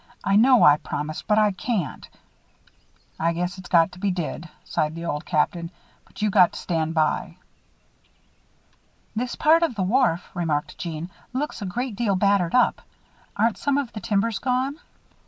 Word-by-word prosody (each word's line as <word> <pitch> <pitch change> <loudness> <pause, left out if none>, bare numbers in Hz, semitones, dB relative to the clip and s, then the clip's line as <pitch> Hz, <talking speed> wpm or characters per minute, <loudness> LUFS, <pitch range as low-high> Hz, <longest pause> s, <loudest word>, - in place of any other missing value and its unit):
"I 195 - +2
know 245 +3 +6
I 145 0 +7
promised, 150 0 -5
but 210 -1 +3
I 210 -1 +4
can't." 190 - -3 1.1
"I 165 +1 +1
guess 180 +3 -3
it's 185 - -11
got 170 0 +4
to 180 - -13
be 200 - 0
did," 170 -2 -4
sighed 155 +1 -2
the 165 0 -6
Old 150 -3 -3
Captain, 170 +1 0 0.4
"but - - -8
you 210 - +2
got 185 -3 +5
to - - -6
stand 160 -1 -2
by." 160 +2 0 1.8
"This 240 +2 -2
part 320 +2 +4
of 330 -8 0
the 195 - -1
wharf," 210 -4 +1
remarked 160 -4 -2
Jeanne, 170 +1 -5 0.2
"looks 280 -1 -3
a 200 - -3
great 240 +4 -3
deal 210 -3 0
battered 195 -2 +2
up. 250 - +3 0.5
Aren't 225 +1 +1
some 285 -1 +1
of 275 -5 -2
the 215 - -5
timbers 210 +2 0
gone?" 260 +4 -1
195 Hz, 170 wpm, -24 LUFS, 170-235 Hz, 1.8 s, I